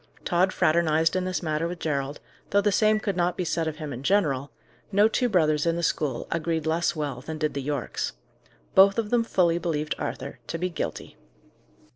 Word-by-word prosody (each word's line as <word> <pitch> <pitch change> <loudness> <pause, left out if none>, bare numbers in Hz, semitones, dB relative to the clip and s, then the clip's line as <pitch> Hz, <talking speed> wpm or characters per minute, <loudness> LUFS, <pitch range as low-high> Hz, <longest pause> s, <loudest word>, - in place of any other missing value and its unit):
Tod 180 +2 +2
fraternized 160 0 +2
in 185 0 0
this 185 -1 -2
matter 155 0 0
with 175 +1 -5
Gerald, 140 -3 -2 0.3
though 200 - +3
the 205 0 +2
same 215 +1 +3
could 200 -3 -2
not 175 0 0
be 180 - -1
said 165 0 -1
of 155 - -3
him 150 -3 -6
in 125 - -7
general; 145 -5 +1 0.4
no 205 +2 +5
two 245 +2 0
brothers 155 -5 +2
in 165 - +2
the 170 - -3
school 145 -6 -1
agreed 165 -1 -1
less 165 +2 +1
well 145 -5 -3
than 155 +3 -6
did 155 -1 -1
the 140 - -3
Yorkes. 140 -2 -3 0.6
Both 195 +2 +6
of 220 -2 -1
them 240 -1 +3
fully 175 -6 +2
believed 155 -3 -1
Arthur 135 0 -5
to 165 - -3
be 180 +2 -2
guilty. 165 - -5
165 Hz, 200 wpm, -26 LUFS, 150-185 Hz, 0.6 s, Both